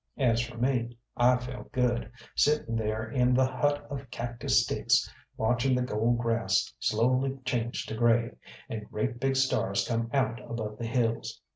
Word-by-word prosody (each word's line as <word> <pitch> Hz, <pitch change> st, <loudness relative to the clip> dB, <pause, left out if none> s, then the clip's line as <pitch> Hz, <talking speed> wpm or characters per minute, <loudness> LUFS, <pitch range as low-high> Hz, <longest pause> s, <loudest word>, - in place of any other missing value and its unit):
As 120 Hz, -4 st, +3 dB
for 120 Hz, 0 st, -6 dB
me, 120 Hz, -1 st, 0 dB, 0.2 s
I 125 Hz, +1 st, +4 dB
felt 125 Hz, 0 st, -8 dB
good, 120 Hz, -3 st, 0 dB, 0.2 s
sitting 150 Hz, -6 st, +2 dB
there 110 Hz, 0 st, -1 dB
in 125 Hz, +1 st, +2 dB
the 130 Hz, +1 st, +4 dB
hut 145 Hz, +3 st, 0 dB
of 135 Hz, -3 st, -6 dB
cactus 120 Hz, 0 st, +1 dB
sticks -, -, +2 dB, 0.3 s
watching 120 Hz, +3 st, +2 dB
the 125 Hz, -, +1 dB
gold 120 Hz, 0 st, +1 dB
grass 115 Hz, -5 st, +1 dB
slowly 130 Hz, +5 st, +1 dB
change 120 Hz, -2 st, -1 dB
to -, -, -6 dB
grey, 115 Hz, +1 st, +3 dB, 0.4 s
and 110 Hz, -2 st, -6 dB
great 120 Hz, +3 st, -2 dB
big 135 Hz, +1 st, +1 dB
stars 100 Hz, -7 st, +1 dB
come 115 Hz, -1 st, -1 dB
out 130 Hz, -3 st, 0 dB
above 105 Hz, -2 st, -4 dB
the 115 Hz, -, -3 dB
hills. 115 Hz, -1 st, -1 dB
120 Hz, 160 wpm, -29 LUFS, 115-130 Hz, 0.4 s, I